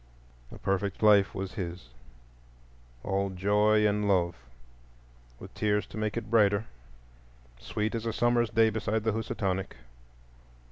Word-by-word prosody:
A - - -10
perfect 100 +1 -2
life 105 -2 +5
was 95 -1 -5
his, 85 - -6 1.1
all 100 0 -1
joy 105 +3 +2
and 105 0 0
love, 85 -3 +2 1.0
with - - -11
tears 105 -1 0
to - - -13
make 110 +1 -2
it 110 -2 -5
brighter,—sweet - - -3
as 115 0 -3
a - - 0
summer's 120 0 +1
day 110 +1 +3
beside 110 0 -2
the 110 -1 0
Housatonic. 95 -3 -3
100 Hz, 125 wpm, -28 LUFS, 95-110 Hz, 1.1 s, life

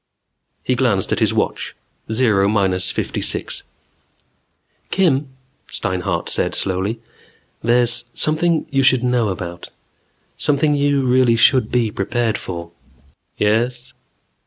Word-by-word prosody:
He 130 - 0
glanced 115 -7 +1
at - - +1
his - - +2
watch. - - -2 0.4
Zero 110 -4 +2
minus 95 -3 +1
fifty - - -3
six - - -2
minutes. - - -40
"Kim," 150 -7 +2 0.4
Steinhart 90 -1 -2
said - - -1
slowly. 95 +4 -1 0.6
"There's 120 0 +2
something 160 +2 +2
you 135 -1 +2
should 130 -2 +3
know 125 -2 +1
about. 85 -3 -6 0.7
Something 150 +1 +2
you 140 -1 +1
really 125 -2 +4
should 130 +2 +4
be 120 -3 +1
prepared 110 +2 -1
for." 85 -2 -7 0.7
"Yes?" 120 +4 0
120 Hz, 115 wpm, -19 LUFS, 100-130 Hz, 0.7 s, really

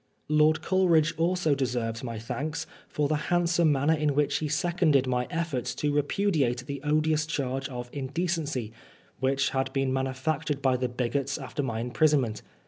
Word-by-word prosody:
Lord 155 +1 +3
Coleridge 170 -4 +3
also 170 -2 +1
de9erveB 120 -4 -2
my 115 -3 -4
thanks 145 +8 -4 0.2
for 150 -1 0
the 155 +1 +1
handsome 175 -2 +3
manner 145 +3 +3
in 150 -2 0
which 145 0 +2
he 155 - -2
seconded 160 -3 +2
my 125 -1 0
efforts 140 -8 -2
to 145 +1 -1
repudiate 145 -5 +1
the 140 -1 -5
odious 155 +1 +1
charge 135 -3 -2
of 125 -2 -6
" - - -26
indecency,'^ 155 -5 -2 0.5
which 135 +1 +1
had 135 0 -1
been 135 -1 0
manufactured 135 +3 -1
by 130 -2 +2
the 125 0 -1
bigots 130 +3 -1
after 135 0 -4
my 115 -4 -2
im^ 125 0 -6
prisonment. 140 -8 +2
140 Hz, 165 wpm, -27 LUFS, 130-155 Hz, 0.5 s, Lord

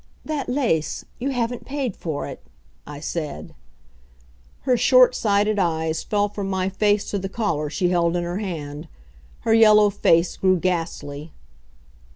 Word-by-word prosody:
"That 305 -4 -3
lace. 245 - 0
You 265 +3 -2
haven't 245 -2 -2
paid 270 -6 -3
for 155 -4 -4
it," - - -8 0.5
I 145 -1 -8
said. 155 -1 -5 1.1
Her 255 -2 +2
short 250 +1 +5
sighted 210 -1 +1
eyes 160 -3 0
fell 205 -1 0
from 200 -1 -5
my 190 -1 0
face 205 +1 +1
to 200 - -1
the 195 0 -4
collar 165 -9 -2
she 175 +5 0
held 170 -1 +1
in 175 - 0
her 175 +3 -3
hand. 155 -6 -5 0.5
Her 225 - +1
yellow 215 -2 +6
face 170 -3 +2
grew 185 -1 +3
ghastly. 165 -4 -3
190 Hz, 150 wpm, -23 LUFS, 165-220 Hz, 1.1 s, yellow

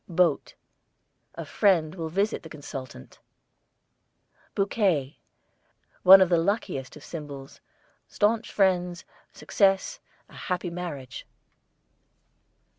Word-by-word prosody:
BOAT, 170 -3 +1 0.8
a - - -6
friend 170 -7 +2
will 165 -3 -5
visit 200 +6 -1
the 160 - -12
consultant. 135 - -10 1.4
BOUQUET, 190 - 0 0.8
one 190 +1 +9
of 185 - +4
the 170 -2 +3
luckiest 175 - -2
of 150 - -13
symbols; 145 -4 -9 0.5
staunch 220 +2 0
friends, 180 -3 0 0.3
success, 195 - 0 0.3
a - - -21
happy 180 -1 -4
marriage. 155 -8 -7
175 Hz, 95 wpm, -26 LUFS, 150-195 Hz, 1.4 s, one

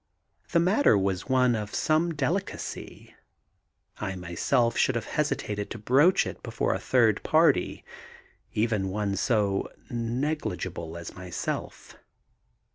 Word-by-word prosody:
The 170 - +4
matter 185 - +4
was 95 +3 -1
one 125 -2 +4
of 105 -2 -4
some 160 +2 +1
delicacy. 160 +7 -4 0.9
I 95 -2 -3
myself 90 +7 0
should 130 - +2
have 115 - -2
hesitated 105 -8 -2
to - - -6
broach 140 - +4
it - - -7
before - - -1
a - - -2
third - - +3
party, - - +2 0.7
even 105 -3 0
one 100 0 -1
so 100 -2 0 0.2
negligible 115 - -3
as 85 - -8
myself. 90 -1 -5
115 Hz, 120 wpm, -27 LUFS, 100-145 Hz, 0.9 s, The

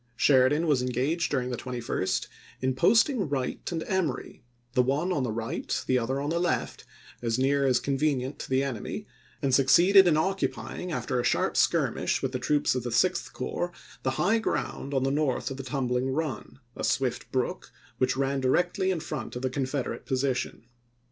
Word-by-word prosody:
Sheridan 140 +5 +4
was 145 -5 +2
engaged 135 +7 0
during 130 -3 -1
the 120 - -2
21st 120 -6 -2 0.3
in 130 0 0
posting 220 - +3
Wright 135 +2 -3
and 165 -2 -2
Emory, 180 - -2 0.3
the 125 - +4
one 145 +9 0
on 145 - 0
the 125 -3 -1
right, 115 +2 -3
the 130 -1 +2
other 130 +3 -1
on 145 +2 -2
the 170 - +1
left, 175 0 -1 0.4
as 115 -1 0
near 135 +1 +2
as 125 -2 +3
convenient 135 0 -1
to - - -7
the 130 +1 +2
enemy, 130 -6 -4 0.4
and 135 - +1
suc 135 0 +4
ceeded 190 +7 +7
in 155 -3 +4
occupying, 185 0 -2
after 135 -5 -1
a - - 0
sharp - - +1
skirmish - - +1
with 135 0 -1
troops 145 +3 +2
of 125 - -1
the 120 0 -4
Sixth 175 +10 +1
Corps, 175 0 -3 0.3
the 130 0 -1
high 220 +5 +3
ground 140 -9 -3
on 130 - +2
the 135 - +1
north 145 -2 0
of 135 0 -5
Tumbling 130 -1 -1
Run, 135 -5 -3 0.2
a - - -6
swift 130 -3 -1
brook 130 -2 -2 0.3
which 130 +1 +1
ran 135 0 0
directly 175 +8 +1
in 180 -4 0
front 135 -8 -5
of 125 - -5
the 130 - 0
Confederate 135 -1 -3
position. 130 -3 -1
135 Hz, 180 wpm, -27 LUFS, 130-155 Hz, 0.4 s, ceeded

